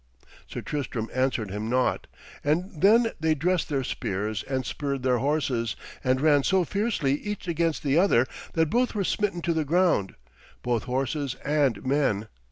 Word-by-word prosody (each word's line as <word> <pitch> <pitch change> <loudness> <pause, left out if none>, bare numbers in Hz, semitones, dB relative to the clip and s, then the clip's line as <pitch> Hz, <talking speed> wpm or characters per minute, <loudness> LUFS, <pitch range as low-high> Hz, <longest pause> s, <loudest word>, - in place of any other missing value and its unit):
Sir - - -6
Tristram 130 -6 -4
answered 130 -6 0
him 105 +3 -3
naught, 125 +1 +1 0.4
and 165 +6 0
then 225 +4 +5
they 160 0 +2
dressed 175 +4 0
their 140 -3 0
spears 105 -2 -2
and 130 -1 -3
spurred 140 -3 -3
their 125 -2 +2
horses, 130 -6 0 0.3
and 130 0 +2
ran 145 -1 +4
so 190 +6 +2
fiercely 200 - 0
each 210 -3 -5
against 165 -2 0
the 145 +2 +3
other 150 -10 +4 0.3
that 160 -1 +1
both 245 -1 +1
were 200 - +1
smitten 190 -3 -1
to 170 - +1
the 160 -1 0
ground, 165 - +2 0.5
both 120 -3 0
horses 135 +2 -2
and 145 -6 +1
men. 130 -7 +1
145 Hz, 165 wpm, -26 LUFS, 125-170 Hz, 0.5 s, then